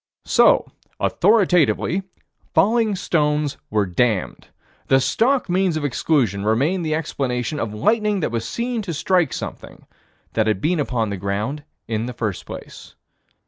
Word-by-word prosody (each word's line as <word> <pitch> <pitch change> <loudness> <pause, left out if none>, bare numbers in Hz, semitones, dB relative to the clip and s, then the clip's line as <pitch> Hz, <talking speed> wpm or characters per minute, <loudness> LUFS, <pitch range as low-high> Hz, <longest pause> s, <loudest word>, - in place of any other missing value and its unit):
So, - - +4 0.3
authoritatively, 185 -3 +2 0.5
falling 220 0 +3
stones 150 -4 0
were 105 -1 +1
damned. 100 +2 -1 0.4
The 135 - +5
stock 250 - +1
means 180 -2 +1
of 150 - -2
exclusion 125 - +1
remained 140 - +1
the 155 -1 0
explanation 135 -3 -2
of 115 -5 -2
lightning 210 - +1
that 150 - -1
was 115 -1 -3
seen 235 -1 -2
to 180 -6 -5
strike 175 -1 +2
something - - -7 0.5
that 110 -1 +1
had 110 -3 +1
been 165 - 0
upon 115 -7 -1
the 100 - -3
ground 105 +10 -3 0.2
in 115 +1 -2
the 125 - -5
first 110 -6 -4
place. - - -10
145 Hz, 140 wpm, -21 LUFS, 110-185 Hz, 0.5 s, The